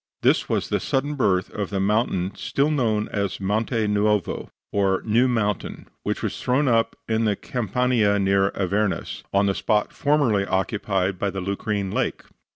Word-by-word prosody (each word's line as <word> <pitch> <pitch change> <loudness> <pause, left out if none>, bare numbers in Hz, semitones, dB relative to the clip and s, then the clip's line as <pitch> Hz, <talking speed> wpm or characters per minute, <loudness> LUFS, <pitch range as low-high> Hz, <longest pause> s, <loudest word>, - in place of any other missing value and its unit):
This - - +3
was - - 0
the - - +1
sudden 145 +2 -1
birth 95 -10 +1
of 100 -2 -3
the 100 - -2
mountain 95 -2 +1
still 140 +8 0
known 110 -7 +1
as 100 -2 -2
Monte 110 +3 0
Nuovo, 105 -1 0 0.2
or 95 -2 +1
New 115 +4 +3
Mountain, 105 -5 -2
which - - -3
was - - -3
thrown 135 +3 +2
up 115 -2 +2
in 110 0 +1
the 105 -2 +2
Campania 120 -2 +1
near 95 0 +3
Avernus, 100 +1 -1
on 100 +1 +3
the 100 - +2
spot 105 +1 0
formerly 140 -9 +2
occupied 95 -1 -1
by 100 - 0
the 95 0 -4
Lucrine 100 +1 -2
Lake. - - -1
105 Hz, 160 wpm, -24 LUFS, 100-115 Hz, 0.2 s, This